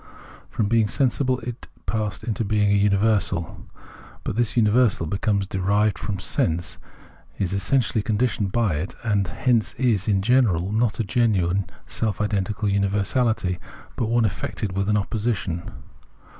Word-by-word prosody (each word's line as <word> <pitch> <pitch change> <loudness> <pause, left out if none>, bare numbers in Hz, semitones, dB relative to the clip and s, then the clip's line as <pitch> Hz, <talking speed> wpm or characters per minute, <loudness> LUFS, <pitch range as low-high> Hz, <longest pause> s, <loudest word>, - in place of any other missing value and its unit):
From 105 - -1
being 115 0 +3
sensible 130 +1 +1
it 120 +1 -7 0.2
passed 105 -3 -2
into 115 -1 -2
being 105 -1 +2
a - - +4
universal; 100 -3 +1 0.6
but - - -3
this 120 0 0
universal, 110 -4 +3
because 100 +3 0
derived 100 +1 +1
from 100 - -3
sense, 85 -2 -1 0.6
is 95 -1 -1
essentially 110 +3 +1
conditioned 105 -2 0
by 105 -8 +1
it, 80 +6 -4
and 100 -4 +1
hence 115 +5 0
is, 115 -6 +1
in 95 -3 +2
general, 105 -7 +3
not 110 +1 +1
a - - +2
genuine 100 -4 +1 0.2
self 110 -4 -2
identical 105 0 -1
universaHty, 100 0 +1 0.4
but 115 - -1
one 120 -1 +3
affected 100 0 -3
with 100 +1 0
an 105 - +3
opposition. 100 -4 -2
105 Hz, 140 wpm, -23 LUFS, 95-115 Hz, 0.6 s, a